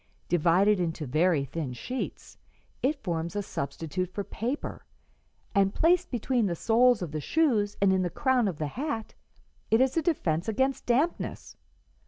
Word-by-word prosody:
Divided 180 +4 +3
into 165 -3 -2
very 155 +2 +2
thin 140 -2 -4
sheets, 255 - -6 0.4
it 275 +3 0
forms 170 -1 -2
a 205 - -1
substitute 165 +3 -4
for 200 +2 -4
paper, 245 +8 -4 0.7
and 195 -1 +2
placed 355 +2 +3
between 240 -2 0
the 175 - -1
soles 235 +3 +3
of 165 - -5
the 155 -1 -3
shoes 220 - +1
and 195 -1 +4
in 190 - +2
the 180 - 0
crown 260 - +1
of 180 -6 -3
the 155 - -2
hat 230 - -4 0.6
it 225 - +4
is 260 0 +2
a 330 - +2
defence 180 - 0
against 265 +4 0
dampness. 275 +8 -1
205 Hz, 160 wpm, -28 LUFS, 170-255 Hz, 0.7 s, and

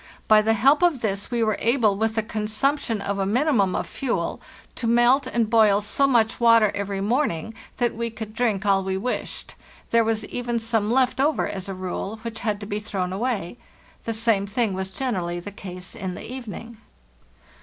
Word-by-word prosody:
By 215 -1 +7
the 225 +1 +2
help 270 - +4
of 340 -8 +3
this 200 -2 -2
we 235 -1 0
were 215 -2 +1
able, 230 -4 +3
with 220 +2 0
the 220 - +1
consumption 220 +2 -1
of 200 0 -2
a 195 - +1
minimum 230 -4 +2
of - - -1
fuel, 215 -11 -3 0.3
to 235 - -3
melt 240 +4 +4
and 235 -2 0
boil 215 -3 +4
so 215 +7 +1
much 230 -4 +2
water 230 -3 +5
every 200 -1 -3
morning 225 - 0 0.2
that 240 -1 +1
we 235 +1 -3
could 220 -1 -8
drink 220 -4 0
all 195 -1 +3
we 190 0 -2
wished. 245 +6 -3 0.4
There 230 0 +5
was 220 -1 -1
even 240 +1 -3
some 225 -2 0
left 255 +2 +2
over, 295 -1 +2
as 190 0 -5
a 195 - -4
rule, 185 +3 -4
which 230 -1 -5
had 210 -2 -1
to - - -5
be 205 0 -3
thrown 190 -4 -3
away. 220 -1 -2 0.5
The 230 - -1
same 220 -3 +2
thing 215 0 0
was 190 0 -3
generally 185 -6 -2
the 205 +4 -8
case 180 -2 -8
in 190 -5 -5
the - - -8
evening. 235 -2 -8
220 Hz, 195 wpm, -24 LUFS, 200-235 Hz, 0.5 s, By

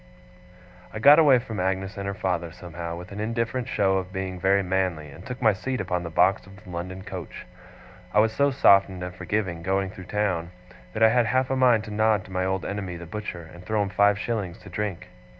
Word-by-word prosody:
I - - -7
got 145 +8 +8
away 145 -5 +6
from 115 -4 -5
Agnes 95 +1 -1
and 100 -1 -5
her 100 - -3
father, 90 -3 -2
somehow, 85 0 -7
with 90 +3 -9
an 100 - -7
indifferent 115 +3 -2
show 95 -1 +2
of 95 0 -7
being 95 -1 -4
very 100 +2 +3
manly, 90 -5 -1
and 80 +6 -12
took 125 +3 -7
my 110 -2 +5
seat 130 +7 -3
upon 90 -2 -1
the 85 - -5
box 95 +4 +2
of 100 - -13
the 90 - -12
London 90 +2 -6
coach. 95 -5 -8 0.7
I 105 - +3
was 110 +1 +3
so 140 +4 +3
softened 100 -8 +4
and 90 0 -5
forgiving, 90 -1 -2
going 95 +1 -1
through 95 - -10
the - - -13
town, 90 -5 -1 0.4
that 110 - +1
I 110 - +8
had 120 0 +3
half 130 +2 +1
a - - +2
mind 125 -4 +4
to 110 - -8
nod 110 -1 +2
to - - -13
my 95 0 -1
old 95 -1 -1
enemy 100 -3 -4
the 85 0 -8
butcher, 90 -2 -6
and 85 +1 -12
throw 105 +2 0
him 100 - -3
five 100 +2 +3
shillings 105 -6 -3
to 100 - -11
drink. 100 -1 -4
95 Hz, 230 wpm, -25 LUFS, 90-110 Hz, 0.7 s, got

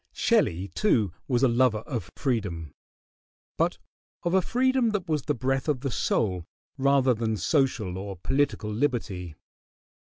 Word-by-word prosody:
] - - -48
Shelley, 90 +4 +2
too, 105 - +1
was 125 -1 +1
a - - +7
lover 120 -3 +2
of 115 - -4
freedom; 95 - -2 0.8
but - - +1 0.5
of 175 - 0
a 190 - +5
freedom 255 +3 +2
that 195 -4 -2
was 155 -2 0
the 150 - -1
breath 135 +3 -1
of 145 -5 0
the 135 -2 -2
soul 90 -7 0 0.3
rather 135 -2 +3
than 110 -1 -1
social 105 - 0
or 100 -1 -6
political 135 0 0
liberty. 105 - -2
125 Hz, 150 wpm, -27 LUFS, 100-140 Hz, 0.8 s, a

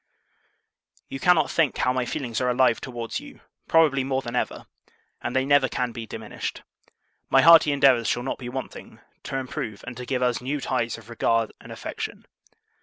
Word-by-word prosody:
You 135 - -5
cannot 180 -1 +3
think 160 -5 +1
how 125 - +1
my 130 -1 -1
feelings 120 -3 -3
are 125 - +1
alive 125 -1 +3
towards 120 -3 -5
you; - - -13 0.3
probably, 150 -5 +4
more 135 0 -1
than 120 +1 -5
ever: - - -2 0.6
and 120 - -4
they 130 0 +2
never 140 -2 +4
can 125 -1 -2
be 115 -1 -7
diminished. - - -6 0.7
My 135 0 +5
hearty 165 -3 +8
endeavours 135 -5 +4
shall 120 - 0
not 135 - -3
be 120 -2 -6
wanting, 130 +1 -7 0.2
to 135 - -4
improve 115 -5 -5
and 120 0 -7
to 125 - -6
give 130 -2 0
US 125 -1 +1
NEW 140 +4 -2
ties 120 -4 -1
of 115 -2 -15
regard 115 -1 +1
and - - -12
affection. - - -6
130 Hz, 180 wpm, -25 LUFS, 120-135 Hz, 0.7 s, hearty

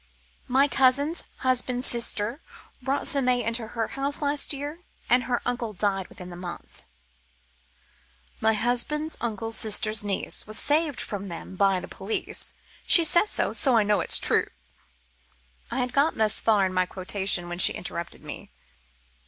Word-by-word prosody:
"My 270 +2 +3
cousin's 280 +4 +2 0.2
husband's 250 0 0
sister 235 +2 0 0.4
brought 270 +2 -2
some 275 -2 +3
may 250 -1 +1
into 230 0 -2
her 225 0 -4
house 280 +1 -2
last 290 0 -1
year, 290 +4 -4 0.3
and 245 0 +4
her 245 -1 -2
uncle 240 -3 -3
died 195 0 -1
within 180 -1 -10
the - - -8
month." 175 0 -9 1.6
"My 220 - +2
husband's 245 +8 -1
uncle's 225 -1 -2
sister's 215 0 +2
niece 200 +1 -2
Was 215 +1 0
saved 295 -2 +1
from 200 -2 -5
them 175 +1 -8
by 195 -1 +2
the - - -8
police. 200 +3 -4 0.3
She 340 - +10
says 345 +6 +3
so, - - -1
so 260 -5 +2
I 220 - +4
know 205 0 +1
it's - - +4
true - - +2 0.6
" - - -37
I - - -4
had 250 0 -3
got 285 +4 +2
thus 220 -1 +3
far 210 -3 +3
in 185 - -3
my 185 0 +1
quotation 190 -1 0
when 175 0 -6
she - - +6
interrupted 170 -1 -6
me. - - -9
225 Hz, 160 wpm, -25 LUFS, 195-270 Hz, 1.6 s, She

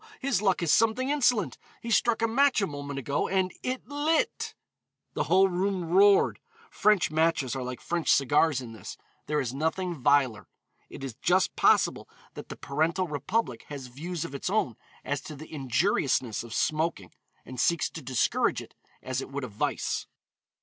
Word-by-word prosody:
His 260 -8 0
luck 190 -4 +1
is 165 - +2
something 225 +4 +3
insolent; 245 -7 +1 0.2
he 230 - -6
struck 230 0 +2
a - - +4
match 270 +3 +3
a 200 - +2
moment 145 -3 -6
ago 140 +2 -1
and 190 -1 0
it 255 0 -4
lit." 315 - 0 0.6
The - - -1
whole 190 +1 +5
room 185 -2 -1
roared. 200 +2 +5 0.3
French 210 -6 +3
matches 155 -5 +1
are 135 - -3
like 125 0 -5
French 170 -1 0
cigars 145 +1 +3
in 120 -2 -8
this, 110 -5 -9 0.3
there 150 0 +1
is 130 -3 -2
nothing 160 +5 -1
viler. 135 -5 +2 0.4
It - - -9
is 135 -3 -5
just 185 +1 +2
possible - - +3 0.2
that - - -9
the - - -6
parental 165 +6 0
republic 145 - -2
has 140 -3 -7
views 160 +7 -5
of 165 - -8
its 140 +5 -3
own 190 - 0 0.3
as 145 -1 -2
to 155 - -9
the 155 +3 -11
injuriousness 135 - 0
of 120 - -11
smoking, 155 - -1 0.3
and 130 -1 -8
seeks 170 -1 +2
to 160 - -8
discourage 130 -2 +1
it - - -11 0.3
as 130 0 -2
it - - -8
would 140 0 -4
a - - -3
vice. 105 0 -2
160 Hz, 175 wpm, -28 LUFS, 135-195 Hz, 0.6 s, whole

